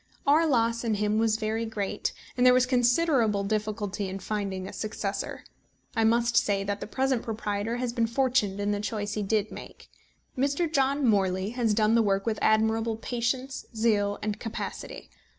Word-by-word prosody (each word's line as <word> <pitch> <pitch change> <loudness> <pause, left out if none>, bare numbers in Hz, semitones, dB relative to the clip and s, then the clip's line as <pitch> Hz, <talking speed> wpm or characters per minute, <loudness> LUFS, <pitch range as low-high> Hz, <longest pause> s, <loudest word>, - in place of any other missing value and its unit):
Our 310 +4 +4
loss 230 -4 +1
in 225 -2 0
him 210 +1 +1
was 220 -1 +2
very 220 +1 -1
great, 215 -3 -3 0.2
and 245 - +1
there 250 0 +7
was 255 0 +4
considerable 245 -4 +2
difficulty 210 -1 -2
in 190 - -4
finding 195 -1 -3
a - - -8
successor. 210 -2 -4 0.5
I 225 -1 +2
must 235 +1 +2
say 200 -1 +2
that 200 0 -3
the - - -6
present 260 +1 0
proprietor 220 0 -3
has 245 -1 -2
been 230 -2 +1
fortunate 235 -5 +1
in 205 0 0
the 205 - -1
choice 210 0 -3
he 210 - -2
did 210 +1 0
make. - - -11 0.5
Mr. 280 +6 +1
John 275 0 +2
Morley 195 -2 +1
has 235 -3 0
done 215 0 +3
the 230 - +5
work 195 -2 +1
with 220 -2 -1
admirable 220 +1 +2
patience, 250 +3 -3
zeal, 210 -2 +1
and 210 0 -2
capacity. 225 -1 -6
220 Hz, 175 wpm, -27 LUFS, 205-240 Hz, 0.5 s, there